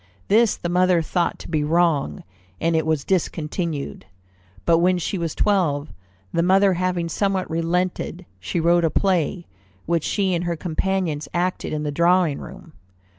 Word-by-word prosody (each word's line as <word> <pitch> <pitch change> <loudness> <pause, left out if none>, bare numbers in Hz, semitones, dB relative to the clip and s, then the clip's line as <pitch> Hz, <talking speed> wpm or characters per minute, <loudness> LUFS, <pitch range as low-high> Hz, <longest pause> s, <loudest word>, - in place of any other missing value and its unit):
This 225 +1 +4
the - - -4
mother 180 -1 +3
thought 175 +2 -1
to - - -10
be 155 -3 0
wrong, 155 - +1 0.4
and 165 0 +1
it 160 0 +1
was 155 -3 +1
discontinued. 160 - -2 0.6
But 165 -1 +4
when 180 +1 +3
she 180 +2 -2
was 165 -2 -3
twelve, 160 -8 +1 0.4
the 170 - +2
mother 190 +2 +4
having 180 -1 -1
somewhat 190 +2 -1
relented, 175 +1 -1
she 95 - -3
wrote 170 +1 +3
a 165 - +3
play, 175 0 0 0.4
which 170 -2 0
she 195 -3 0
and 175 0 -1
her 170 -1 -1
companions 165 -2 -2
acted 180 +1 -1
in 150 0 -2
the 150 - -2
drawing 170 -1 +2
room. 165 - -11
170 Hz, 160 wpm, -22 LUFS, 160-185 Hz, 0.6 s, This